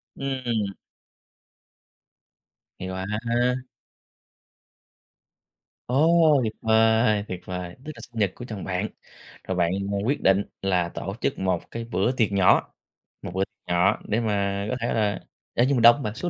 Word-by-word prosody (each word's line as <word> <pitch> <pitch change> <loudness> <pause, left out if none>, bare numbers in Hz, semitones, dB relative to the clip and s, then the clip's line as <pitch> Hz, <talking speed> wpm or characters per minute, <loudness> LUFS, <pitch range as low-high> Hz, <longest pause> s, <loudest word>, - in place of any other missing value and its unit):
Ừm. 120 -7 -2 2.1
Hay 95 - -5
quá! 95 0 -4 2.8
Ồ, 155 +2 +4
tuyệt 110 -1 -2
vời, 110 -1 +3
tuyệt 90 -1 -5
vời! 90 -1 -5
Tức 155 - -5
là - - -11
sinh 115 -2 -9
nhật 100 -3 +2
của 120 - -8
chồng 110 -6 -6
bạn, 95 +3 -2 0.6
rồi 95 -1 -3
bạn, 85 0 +2 0.2
ờ, 100 - 0
quyết 140 +3 0
định 95 +1 +4 0.2
là 90 -3 +1
tổ - - -5
chức - - -1
một 95 -3 -1
cái 115 0 -4
bữa 115 +1 0
tiệc 115 -5 +1
nhỏ, 95 -2 +3 0.5
một - - -6
bữa 95 +1 +1
tiệc 105 -2 -50
nhỏ 95 +4 +3
để 110 - +1
mà 100 -2 -1
có 125 - -1
thể 120 - 0
là 105 -3 0 0.3
ê, 120 - +3
nhưng 135 -1 +2
mà - - +2
đông 120 +2 +9
hông 145 - -7
bạn? 105 -2 -3
Số 175 - -3
105 Hz, 160 wpm, -25 LUFS, 95-120 Hz, 2.8 s, đông